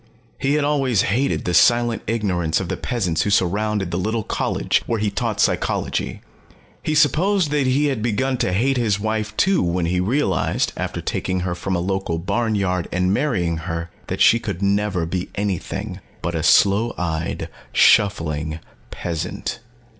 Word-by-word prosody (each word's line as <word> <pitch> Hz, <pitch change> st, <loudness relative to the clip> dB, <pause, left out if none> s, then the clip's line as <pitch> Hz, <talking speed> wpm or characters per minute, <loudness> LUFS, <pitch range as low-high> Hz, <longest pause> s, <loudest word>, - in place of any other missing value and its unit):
He 140 Hz, +1 st, +1 dB
had 150 Hz, -, +1 dB
always 135 Hz, -7 st, +2 dB
hated 130 Hz, +7 st, 0 dB
the 90 Hz, -, -1 dB
silent 120 Hz, +4 st, +4 dB
ignorance 95 Hz, -8 st, 0 dB
of -, -, -4 dB
the -, -, -1 dB
peasants 90 Hz, -10 st, -1 dB
who 105 Hz, -, 0 dB
surrounded 100 Hz, 0 st, +1 dB
the 85 Hz, -, -1 dB
little 110 Hz, +3 st, -1 dB
college -, -, 0 dB
where 115 Hz, -, 0 dB
he 105 Hz, -1 st, 0 dB
taught -, -, -2 dB
psychology. -, -, 0 dB, 0.6 s
He 155 Hz, -, -1 dB
supposed 165 Hz, +4 st, +3 dB
that 145 Hz, -3 st, +1 dB
he 135 Hz, +3 st, +2 dB
had 135 Hz, -6 st, -1 dB
begun 125 Hz, +4 st, 0 dB
to 95 Hz, -, 0 dB
hate 130 Hz, +8 st, +1 dB
his 110 Hz, -4 st, +1 dB
wife, 110 Hz, 0 st, -2 dB
too, 190 Hz, -2 st, +3 dB
when 85 Hz, 0 st, 0 dB
he 90 Hz, +2 st, 0 dB
realized, 125 Hz, +11 st, 0 dB
after -, -, -4 dB
taking 95 Hz, -1 st, -2 dB
her 90 Hz, -1 st, -2 dB
from 90 Hz, +2 st, -3 dB
a -, -, 0 dB
local 95 Hz, -2 st, -1 dB
barnyard 95 Hz, -1 st, -1 dB
and 90 Hz, +1 st, +1 dB
marrying 95 Hz, -, 0 dB
her, 85 Hz, 0 st, -5 dB, 0.2 s
that -, -, -3 dB
she -, -, +6 dB
could -, -, -4 dB
never 100 Hz, -3 st, +1 dB
be 90 Hz, +2 st, -3 dB
anything 100 Hz, 0 st, -3 dB, 0.2 s
but 85 Hz, -, -2 dB
a 80 Hz, -, -1 dB
sloe 100 Hz, +7 st, +4 dB
eyed, 80 Hz, -3 st, -2 dB, 0.2 s
shuffling 80 Hz, -6 st, +3 dB, 0.3 s
peasant. 85 Hz, +2 st, -4 dB
100 Hz, 165 wpm, -21 LUFS, 90-120 Hz, 0.6 s, she